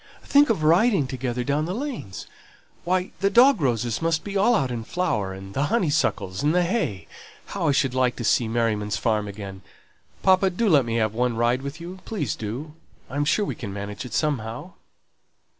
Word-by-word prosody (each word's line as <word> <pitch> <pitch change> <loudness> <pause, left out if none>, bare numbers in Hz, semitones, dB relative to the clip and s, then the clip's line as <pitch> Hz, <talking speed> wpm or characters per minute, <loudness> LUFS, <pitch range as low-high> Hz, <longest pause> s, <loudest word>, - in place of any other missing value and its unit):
"Think 285 0 +4
of 200 -9 +1
riding 175 - +4
together 125 -1 -3
down 145 +3 0
the 180 +3 -3
lanes 240 - -5 0.6
why, 185 +1 0
the 195 - +2
dog 245 - +5
roses 120 -3 0
must 165 -1 0
be 200 -1 -6
all 215 +5 +4
out 135 - 0
in 115 -2 -4
flower, 110 - -1
and 95 +1 -9
the 140 +5 0
honeysuckles, 145 - 0
and 150 +3 +2
the 180 - +4
hay 170 - -1 0.4
how 185 -5 -3
I - - +4
should 135 -2 +1
like 130 -1 +1
to 120 - -5
see 115 +1 +2
Merriman's 110 -3 0
farm 105 0 0
again! 100 -1 -8 0.6
Papa, 190 0 +4
do 200 +5 -1
let 145 - +5
me 115 -1 -2
have 110 -2 +1
one 120 0 0
ride 120 +2 +2
with 140 +3 -6
you! 180 +3 -8
Please 160 - -3
do. 125 +9 -6 0.4
I'm 145 +2 0
sure 205 +7 +2
we - - -3
can 105 -6 -7
manage 100 +2 -6
it 125 - -9
somehow." 145 +2 -2
135 Hz, 190 wpm, -24 LUFS, 115-180 Hz, 0.6 s, dog